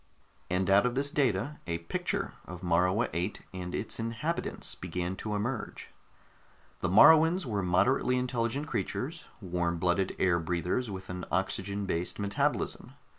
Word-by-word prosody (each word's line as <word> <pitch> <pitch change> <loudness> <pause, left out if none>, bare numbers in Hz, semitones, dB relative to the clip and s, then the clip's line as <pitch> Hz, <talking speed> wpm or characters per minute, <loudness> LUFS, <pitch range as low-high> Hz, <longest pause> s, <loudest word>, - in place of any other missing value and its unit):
And 90 +1 +1
out 100 +4 +5
of 125 - -2
this 140 +1 0
data, 135 0 0
a 85 0 0
picture 85 0 -2
of 90 0 -9
Morua 90 +6 +2
VIII 90 +5 -1 0.2
and 90 -1 -5
its 110 - -3
inhabitants 115 +9 -3
began 90 +1 -3
to 105 +1 -3
emerge. 115 +4 -3 0.9
The 90 - -1
Moruans 160 - +7
were 105 -5 -1
moderately 100 +8 +2
intelligent 125 +2 -1
creatures, 155 +1 -3
warm 85 -2 -1
blooded 90 +2 +1
air 85 -2 +3
breathers 90 +8 -1
with 95 -1 -6
an 90 0 -5
oxygen 100 +1 -1
based 90 -2 -2
metabolism. 100 -1 -1
100 Hz, 140 wpm, -30 LUFS, 90-125 Hz, 0.9 s, Moruans